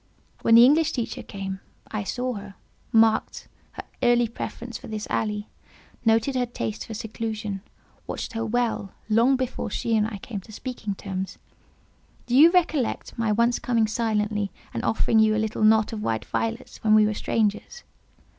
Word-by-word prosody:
When 230 - +5
the 235 +1 +10
English 315 +4 +4
teacher 235 -4 -3
came, 195 -1 -6 0.3
I 215 -1 -2
saw 250 +5 -2
her, 200 -2 -8 0.4
marked 225 -1 +3 0.3
her - - -7 0.2
early 240 -1 +4
preference 235 +1 -7
for - - -11
this 215 -1 -4
alley, 210 -1 -1 0.6
noticed 225 +4 +2
her 250 -1 +1
taste 110 - -4
for 220 - -6
seclusion, 215 -2 -4 0.5
watched - - -5
her 225 0 -2
well, 225 -3 -1 0.2
long 230 +5 +4
before 255 -3 -3
she 225 +2 -1
and 215 -1 +2
I 215 -2 -6
came 205 +1 -6
to 215 - -15
speaking 215 -3 -5
terms; 190 -1 -5 0.9
do 245 - -1
you 305 +5 +9
recollect 320 -8 0
my 225 -2 0
once 235 +3 +2
coming 230 -2 +2
silently 210 -2 0 0.2
and - - -3
offering 220 0 +2
you 215 0 +4
a 220 - +1
little 220 0 -3
knot 220 0 +4
of 215 - -4
white 110 - -1
violets 115 -1 -3
when 215 -1 +5
we 215 0 +6
were 215 - 0
strangers?" 215 - -1
220 Hz, 170 wpm, -25 LUFS, 210-240 Hz, 0.9 s, the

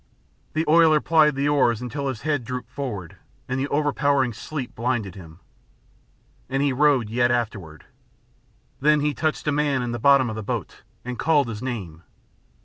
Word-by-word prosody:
The 160 +1 0
oiler 160 -1 +5
plied 155 -2 +3
the 140 +1 0
oars 130 -6 +2
until 135 +3 -4
his 130 -5 -4
head 145 -4 0
drooped 125 0 -6
forward, 110 - -6 0.3
and 130 +1 -2
the 135 - -1
overpowering 145 -3 +1
sleep 135 +3 -6
blinded 115 -5 -2
him. 85 -3 -13 1.1
And 135 +1 0
he 140 -2 +1
rowed 135 -4 +3
yet 120 +1 +2
afterward. 105 -10 -3 0.9
Then 150 +1 +3
he 150 0 0
touched 155 0 -2
a - - +3
man 145 -3 0
in 120 - -3
the 120 - -4
bottom 140 +1 +5
of 110 - -4
the 110 - -4
boat, 100 - -5 0.2
and 125 -1 -5
called 150 -5 +3
his 110 -1 -6
name. 100 -11 -5
130 Hz, 170 wpm, -23 LUFS, 115-145 Hz, 1.1 s, oiler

